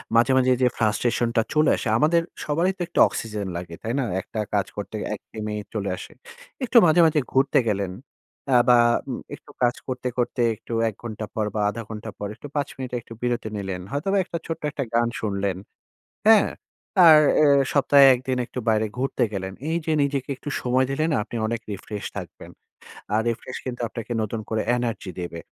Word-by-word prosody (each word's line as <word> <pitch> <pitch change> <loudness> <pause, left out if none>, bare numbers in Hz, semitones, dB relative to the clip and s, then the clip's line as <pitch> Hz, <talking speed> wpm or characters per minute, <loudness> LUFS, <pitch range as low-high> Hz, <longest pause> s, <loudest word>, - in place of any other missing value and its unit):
মাঝে, 120 +3 +5
মাঝে 130 0 +4
যে - - +6
ফ্রাস্ট্রেশন 115 +2 +1
টা 115 - +5
চলে 155 0 +4
আসে, - - -4
আমাদের 165 +6 +3 0.2
সবারই 165 +5 +1
তো - - -8
একটু 170 - -2
অক্সিজেন 105 -3 -4
লাগে, 85 -1 -7
তাই 115 - -2
না? - - +1 0.2
একটা 110 - -7
কাজ - - +2
করতে - - -5 0.2
একঘেয়েমি 105 -1 -6 0.2
চলে 100 -3 -2
আসে। - - -9 0.5
একটু 250 -1 +3
মাঝে, 160 +1 +4
মাঝে 160 -1 +3
ঘুরতে 135 +1 +3
গেলেন 100 -3 0 0.6
অ্যা 125 -2 +6
বা 120 - +7 0.3
উম - - -3 0.2
একটু - - -17
কাজ 120 0 +3
করতে, 130 -1 -3
করতে 120 0 0
একটু 115 - -9 0.2
১ 110 - -10
ঘন্টা 110 -2 -5
পর 110 - 0
বা - - 0
১/২ 110 +3 -5
ঘন্টা 110 0 -6
পর 105 - -4
একটু 115 - -10
৫ 145 -1 0
এর - - -14
মিনিট 130 -2 -5
একটু 115 - -12
বিরতি 120 -2 -1
নিলেন। 95 -2 -4
হয়তোবা 195 +8 0
একটা 170 - -4
ছোট্ট 165 - -4
একটা 140 - -3
গান 120 0 +3
শুনলেন, 100 -3 -1 0.7
হ্যাঁ? 220 -3 +7 0.6
আর 155 -2 +10 0.2
এ - - +6 0.3
সপ্তাহে 140 -1 +6
১ 125 - -4
দিন 130 -1 +1
একটু - - -8
বাইরে 110 0 +3
ঘুরতে 135 +2 -1
গেলেন। 95 -1 -4 0.2
এইযে 165 -1 -1
নিজেকে 140 -1 -1
একটু 145 - -8
সময় 130 +1 +2
দিলেনা 155 +3 0
আপনি 120 - -7
অনেক 115 0 -2
রিফ্রেশ 100 +1 -6
থাকবেন। - - -8 0.6
আর 110 - +3
রিফ্রেশ 125 +2 -6
কিন্তু 125 -1 -5
আপনাকে 115 +2 -6
নতুন 110 +1 -3
করে 110 -1 0
এনার্জি 115 -5 -3
দেবে। 85 -1 -5
120 Hz, 190 wpm, -24 LUFS, 110-140 Hz, 0.7 s, আর